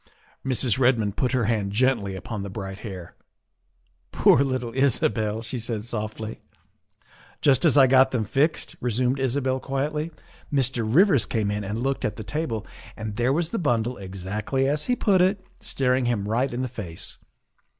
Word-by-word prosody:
Mrs. 130 -2 +1
Redmond 115 -6 +2
put 125 - 0
her 125 -3 +2
hand 105 -3 0
gently 110 -5 +1
upon 100 +3 -5
the 100 - -5
bright 95 0 -6
hair. 95 -6 -8 0.5
" - - -44
Poor 135 - +5
little 130 -4 -2
Isabel," 110 -5 +1
she 120 +2 -4
said 110 -2 -2
softly. 110 -1 -4 1.0
"Just 135 +1 +4
as 150 -3 +6
I 135 - +8
got 130 0 +5
them 120 -4 -1
fixed," 145 +10 0
resumed 125 +3 0
Isabel 130 0 0
quietly, 150 +4 -2 0.2
" - - -26
Mr. 130 -4 +1
Rivers 160 - +4
came 105 -3 -1
in 105 0 -2
and 105 +4 -3
looked 135 0 -1
at - - -1
the 110 - -7
table, 115 -8 -3 0.3
and 110 -1 -5
there 120 +4 +1
was 165 +3 0
the 230 - -1
bundle 120 -6 0
exactly 100 +8 -2
as 150 +2 +1
he 250 - +1
put 195 -6 +3
it, 190 +1 +1
staring 130 -1 0
him 110 -4 -1
right 120 +5 0
in 120 +2 -2
the - - -1
face. 100 -9 -6
125 Hz, 175 wpm, -25 LUFS, 110-135 Hz, 1.0 s, I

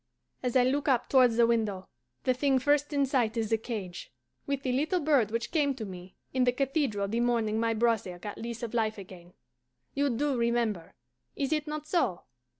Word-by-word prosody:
As 250 -1 -2
I 255 - +6
look 275 +4 0
up 255 -3 +2
towards 250 -4 +5
the 235 - +6
window, 215 -5 0 0.4
the 255 - +3
thing 270 +1 +2
first 290 +3 +2
in 280 -1 +2
sight 245 -4 0
is 225 -1 -1
the 225 - +4
cage, 210 -6 -6 0.4
with 280 -1 -2
the 255 - 0
little 305 +8 +1
bird 285 -9 +3
which 230 +1 -3
came 285 -4 +1
to 225 -4 -5
me 185 -1 -10 0.2
in 260 -1 +2
the 250 - +4
cathedral 265 -6 0
the 225 +4 -1
morning 230 -3 +1
my 230 0 +1
brother 220 -6 0
got 205 +4 -7
lease 235 0 -6
of 235 - -4
life 220 -2 0
again: 180 -2 -12 0.6
you 285 0 +1
DO 275 +3 0
remember 235 -7 -1 0.4
is 280 +2 -1
it 305 0 -1
not 300 0 -4
so? 290 - 0
240 Hz, 200 wpm, -29 LUFS, 220-275 Hz, 0.6 s, I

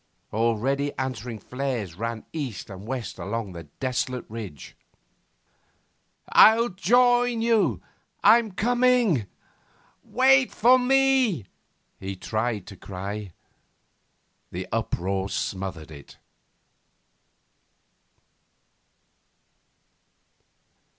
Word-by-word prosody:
Already 120 +6 0
answering 125 -3 -4
flares 125 -4 -4
ran 115 +4 -5
east 130 - -5
and 95 +2 -10
west 130 -2 -5
along 115 -4 -4
the 85 -1 -9
desolate 130 -1 -2
ridge. 105 -11 -8 1.6
'I'll 230 +2 +7
join 245 +5 +3
you! 230 -2 +2 0.4
I'm 230 -2 +5
coming! 240 - +2 0.8
Wait 260 +1 +4
for 250 +3 +5
me!' 260 - +2 0.5
he 95 0 -5
tried 110 +1 -2
to 100 - -11
cry. 100 +2 -6 1.2
The - - -5
uproar 95 +2 -2
smothered 95 -6 -4
it. 70 -2 -13
125 Hz, 75 wpm, -25 LUFS, -, 1.6 s, I'll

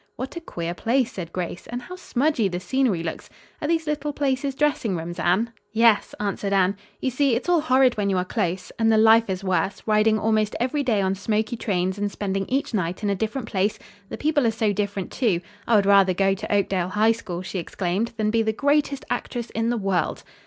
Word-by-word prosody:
"What 260 +6 -6
a 340 - -5
queer 170 - -4
place," 235 +6 0
said 170 -3 -6
Grace, 175 -1 -5
"and 245 +1 -5
how 365 - -8
smudgy 285 - 0
the 175 -1 -3
scenery 200 -2 0
looks! 160 - -5 0.3
Are 295 - -1
these 325 0 +1
little 295 -1 -2
places 275 -1 -1
dressing 275 -9 +1
rooms, 170 +2 -6
Anne?" 195 +8 +1 0.2
"Yes," 225 -1 +3
answered 200 -1 -2
Anne. 190 0 +3 0.3
"You 260 - 0
see, 265 -1 +2
it's 240 - -3
all 350 -2 +3
horrid 260 -4 +3
when 200 -1 0
you 190 - +1
are 180 - 0
close. 180 0 -2
And 225 0 +4
the 220 - +4
life 225 0 +5
is 190 0 -3
worse 190 +1 -1
riding 215 0 +3
almost 215 -1 +1
every 260 +5 0
day 225 -7 +1
on 190 0 +1
smoky 215 +4 -1
trains 190 -3 -1
and 205 0 -1
spending 195 -1 -2
each 270 0 -1
night 180 -1 -2
in 205 - +1
a - - +1
different 220 +4 -3
place. 200 0 0 0.3
The - - -5
people 295 -4 +2
are - - +4
so 220 -2 0
different, 200 -1 -3
too. 215 -10 +1 0.3
I 235 - +4
would 200 -2 +4
rather 195 -2 +5
go 195 +1 +3
to 195 - -5
Oakdale 195 -3 +1
High 215 +4 +3
School," 185 -6 -5
she 190 0 -4
exclaimed, 185 +5 -2
"than 215 -1 +1
be 225 0 +2
the 220 0 0
greatest 285 +1 +1
actress 240 -2 -3
in 225 +1 -1
the 240 - 0
world." 195 -6 -1
215 Hz, 220 wpm, -24 LUFS, 190-250 Hz, 0.3 s, life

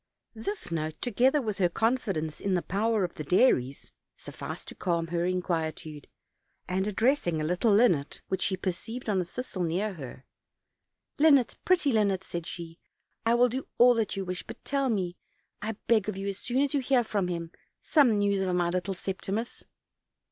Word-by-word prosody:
This 235 - -4
note, 155 -1 -3
together 255 +5 +2
with 215 -3 -3
her 180 -2 +3
confidence 195 -8 -1
in 195 -2 0
the 175 - 0
power 215 +2 +1
of 175 - -2
the 155 - -6
Dairies, 140 - +2 0.2
sufficed - - -8
to - - -9
calm 170 -2 -1
her 170 0 0
inquietude, 160 -4 -2 0.6
and, 190 +2 0
ad 210 - -3
dressing 225 - +2
a - - -1
little 180 +8 +2
linnet 200 -10 +3
which 190 - -2
she 190 - 0
perceived 200 +7 -4
on 195 -3 +2
a - - -3
thistle 205 0 -5
near 180 +5 0
her: 135 -5 -9 0.9
"Linnet, 285 -5 +5
pretty 355 -6 +3
linnet," 200 -4 +2
said 170 -3 -5
she, 165 -1 -7 0.5
"I 230 - +5
will 245 +1 +5
do 260 +3 -4
all 245 +1 +7
that 225 -3 -1
you 195 -1 -3
wish, 180 0 -4
but - - -11
tell 275 -1 0
me, 185 -5 -1 0.4
1 220 0 -4
beg 215 -3 +3
of 200 - -4
you, 195 +1 -3
as 195 - -5
soon 255 +3 +1
as 285 - -1
you 285 - +2
hear 260 -1 +3
of 225 - -9 0.2
him, 170 -2 -4 0.3
some 265 -9 +4
news 200 -1 +2
of 185 -2 0
my 175 -1 +2
little 180 +2 -2
Septimus." 195 +5 -4
195 Hz, 185 wpm, -28 LUFS, 175-235 Hz, 0.9 s, all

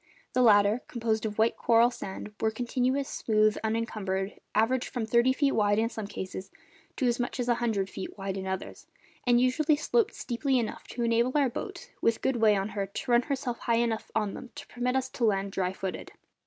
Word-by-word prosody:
The 255 - +3
latter, 210 0 +5
composed 225 -2 -1
of 210 - -6
white 225 +1 +3
coral 235 +1 +4
sand, 210 -2 -7
were 220 - +3
continuous, 255 +4 -1
smooth, 215 -1 +2
unencumbered, 215 -4 -2 0.2
averaged 240 +4 +2
from 240 -3 -3
thirty 235 +3 +4
feet 275 +1 +2
wide 205 -3 +2
in 225 +1 +2
some 220 -4 -6
cases 190 -1 -6 0.5
to 265 - -1
as 240 0 +1
much 245 +2 -2
as 245 - -1
a 240 - +4
hundred 210 -5 0
feet 190 +1 -7
wide 195 -1 -3
in 190 -1 -4
others, 190 0 -5 0.4
and 240 -1 +5
usually 285 +5 +3
sloped 435 +8 +1
steeply 260 +2 0
enough 230 -3 -3
to 240 - -4
enable 235 +2 +2
our 280 -3 +3
boat, 240 - -7
with 230 - +2
good 265 -2 +1
way 220 -2 +5
on 195 +1 -1
her, 200 -1 -3
to 200 +5 -5
run 240 0 +6
herself 260 -3 -3
high 235 - +1
enough 230 -1 0
on 210 -3 0
them 255 - -8
to 290 -1 -8
permit 245 +1 -2
us 260 0 +1
to 255 - -5
land 200 -3 +1
dry 185 -1 -1
footed. 190 -1 -5
230 Hz, 210 wpm, -28 LUFS, 205-250 Hz, 0.5 s, run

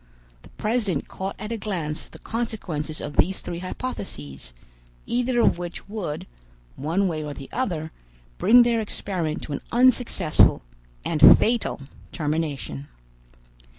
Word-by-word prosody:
The - - -16
president 210 - -1
caught 190 +1 -5
at 210 +2 -6
a 230 - -1
glance 175 -7 -4
the - - -12
consequences 180 -10 -3
of 145 - -6
these 190 +4 +3
three 170 - -5
hypotheses, 75 - -6 0.5
either 245 0 +1
of 175 - +3
which 175 -1 -6
would, 200 -8 -4 0.5
one 170 +8 0
way 155 -3 -2
or 145 -1 -5
the 135 - -10
other, 170 -11 -2 0.5
bring 245 +2 +7
their 235 -1 +2
experiment 180 -7 -3
to 150 - -5
an - - -3
unsuccessful 240 - +4 0.4
and 155 -2 +8
fatal 230 -9 0 0.3
termination. 150 - -2
175 Hz, 130 wpm, -25 LUFS, 150-220 Hz, 0.5 s, and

